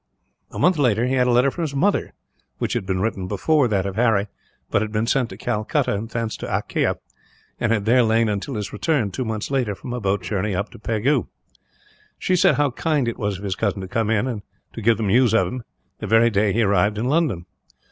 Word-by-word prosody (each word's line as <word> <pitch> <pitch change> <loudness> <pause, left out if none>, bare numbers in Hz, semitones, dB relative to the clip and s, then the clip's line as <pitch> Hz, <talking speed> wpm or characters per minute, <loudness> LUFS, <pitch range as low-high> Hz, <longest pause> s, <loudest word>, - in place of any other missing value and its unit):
A - - -9
month 180 -4 +3
later 120 -4 +2
he 130 - 0
had 125 -1 +3
a - - +3
letter 125 +3 +4
from 175 - -6
his 150 -4 -3
mother, 195 +9 +1 0.5
which - - -2
had 95 - -2
been 95 -1 -1
written 95 -3 -2
before 150 +6 +2
that 100 -4 0
of 100 0 -4
Harry, 110 -4 +2 0.4
but - - +2
had 110 -1 -3
been 110 +1 0
sent 125 0 +1
to - - -9
Calcutta 110 -4 -1
and 105 +3 -4
thence 115 -1 -3
to - - -6
Akyah; - - 0 0.6
and 120 -2 0
had 105 -3 +1
there 125 +3 +5
lain 115 0 +3
until 105 +6 -3
his 105 -2 -4
return, 105 0 0
two 130 - -3
months 110 +1 -4
later, 125 -7 0
from 120 +7 -7
a 125 - -4
boat 100 -2 0
journey 100 +1 -2
up 100 +3 -3
to - - -13
Pegu. 115 +5 0 0.9
She 185 - +1
said 180 - +4
how 145 -2 +1
kind 145 0 0
it 115 - -3
was 100 -3 -1
of 100 - -11
his 100 -2 -1
cousin 100 -1 -1
to 95 - -6
come 110 +3 -1
in, 115 0 0 0.3
to 115 - -7
give 115 0 +3
them 110 - -2
news 115 +3 +3
of - - +4
him, 125 0 -5 0.4
the 105 - -5
very 115 +3 +4
day 105 0 +2
he 115 +3 +2
arrived 100 +1 +2
in 110 - -1
London. 130 - +1
110 Hz, 235 wpm, -22 LUFS, 100-125 Hz, 0.9 s, there